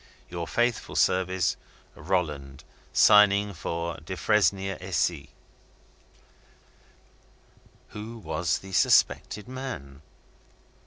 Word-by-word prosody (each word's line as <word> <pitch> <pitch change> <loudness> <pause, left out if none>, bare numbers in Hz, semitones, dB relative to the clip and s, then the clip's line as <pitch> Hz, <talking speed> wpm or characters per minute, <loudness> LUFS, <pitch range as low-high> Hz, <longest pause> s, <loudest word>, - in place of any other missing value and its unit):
Your 85 -1 -5
faithful 120 -1 -1
servant 95 -1 +1 0.4
ROLLAND, 75 -6 -3 0.3
(Signing 105 0 +5
for 85 -1 -4
Defresnier 95 -1 0
and 95 -1 -5
Cie.) 75 -6 0 2.6
Who 110 +3 -8
was 90 -5 -1
the 95 - -12
suspected 105 +3 +2
man? 125 - -7
95 Hz, 75 wpm, -26 LUFS, 85-105 Hz, 2.6 s, Signing